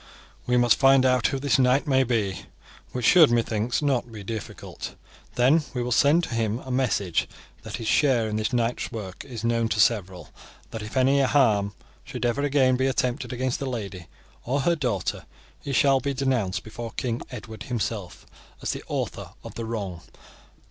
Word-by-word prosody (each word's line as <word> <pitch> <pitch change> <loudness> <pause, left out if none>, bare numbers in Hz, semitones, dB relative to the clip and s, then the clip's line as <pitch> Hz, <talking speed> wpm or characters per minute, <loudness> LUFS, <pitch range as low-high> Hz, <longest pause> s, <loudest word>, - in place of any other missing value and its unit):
"We 125 0 +3
must 120 -1 +4
find 135 -1 +6
out 130 -2 +3
who 135 - -2
this 140 0 +1
knight 130 +2 +3
may 135 -2 +3
be, 110 -7 -2 0.4
which 125 -2 -3
should, 165 +1 +7
methinks, 115 +2 0
not 130 -4 0
be 105 -2 -8
difficult. 110 +1 -7 0.4
Then 135 +7 +4
we 125 - -1
will 125 - -3
send 150 +7 +4
to 130 - -4
him 115 -1 0
a 130 - -6
message 105 -9 0 0.3
that - - -6
his 115 - -6
share 125 -6 +3
in 105 - -3
this 110 +2 -1
night's 120 -1 -1
work 100 -5 -7
is 120 -5 -8
known 115 -1 +1
to 105 - -1
several, 95 -5 +2
and - - -21
that 115 - -5
if 105 +5 -6
any 135 +2 +4
harm 110 -8 +2 0.3
should - - -5
ever 120 +4 0
again 135 -3 +3
be 130 +1 +1
attempted 125 -1 -1
against 130 0 -2
the 135 - -3
lady 100 -7 -6 0.4
or 140 +4 0
her 170 +5 +2
daughter, 120 - -2 0.3
he 140 - -5
shall 135 0 +4
be 140 0 -2
denounced 125 -8 0
before 115 +1 -7
King 120 -2 -2
Edward 110 -3 -9
himself 110 -6 -4 0.3
as - - -2
the - - -6
author - - -4
of - - -9
the 115 - -5
wrong. 100 -7 -4
120 Hz, 185 wpm, -25 LUFS, 110-135 Hz, 0.4 s, should